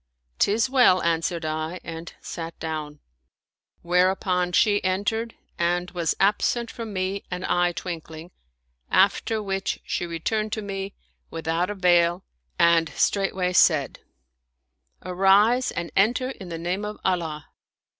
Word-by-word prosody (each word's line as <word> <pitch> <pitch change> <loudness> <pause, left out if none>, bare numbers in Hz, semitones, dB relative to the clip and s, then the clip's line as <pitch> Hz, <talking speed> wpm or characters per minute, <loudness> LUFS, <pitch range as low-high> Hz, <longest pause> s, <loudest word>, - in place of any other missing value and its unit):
" 60 +1 -46
'Tis 220 +5 +3
well," 250 -8 +5
answered 165 0 0
I 155 +3 -3
and 165 0 -7
sat 165 0 -7
down: 155 -2 -5 0.8
whereupon 180 0 +1
she 205 +2 +3
entered 205 +5 -1 0.2
and 175 +1 0
was 170 -3 -1
absent 225 +4 +1
from 230 -2 -7
me 190 +1 -2
an 180 0 -4
eye 175 0 +2
twinkling, 165 -1 -7 0.6
after 200 +3 +2
which 195 -1 -2
she 175 - -3
returned 215 +6 -2
to 215 - -3
me, 195 0 -5 0.3
without 165 +2 -1
a 205 - -3
veil, 175 -1 +3 0.3
and 170 -1 +4
straightway 190 -2 +1
said, 155 -6 +3 0.5
" 60 - -35
Arise 195 +7 +4
and 170 0 -4
enter 245 +6 +2
in 190 -8 -10
the 165 - -4
name 180 +4 -2
of 210 0 -5
Allah." 165 -5 -1
180 Hz, 135 wpm, -24 LUFS, 165-200 Hz, 0.8 s, well